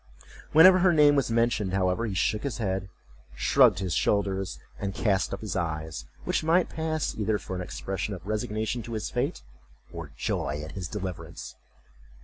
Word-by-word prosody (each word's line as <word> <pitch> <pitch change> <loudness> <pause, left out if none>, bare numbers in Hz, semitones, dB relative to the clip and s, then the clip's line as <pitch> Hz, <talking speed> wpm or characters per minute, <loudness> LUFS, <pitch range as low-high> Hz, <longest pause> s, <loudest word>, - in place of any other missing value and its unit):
Whenever 185 +4 +8
her 180 -1 +4
name 150 -2 +6
was 140 -4 +1
mentioned, 115 -4 +1
however, 95 +4 +1
he 100 - -4
shook 105 +3 +1
his 140 -5 -3
head, 95 -4 -2 0.5
shrugged 125 -8 +5
his 95 -2 -2
shoulders, 95 -2 0 0.2
and 100 -1 -3
cast 100 -3 +1
up 100 - -5
his 110 -3 -4
eyes; 80 -6 -3 0.2
which - - 0
might 165 +3 +3
pass 160 -1 -2
either 105 0 +1
for 95 - -6
an 90 - -3
expression 95 +2 -4
of 90 - -12
resignation 110 +2 -2
to 115 +1 -7
his 110 - -3
fate, - - -2 0.5
or 85 -3 -7
joy 75 - -2
at 80 - -7
his 90 -2 -5
deliverance. 95 -1 -6
105 Hz, 170 wpm, -27 LUFS, 95-120 Hz, 0.5 s, Whenever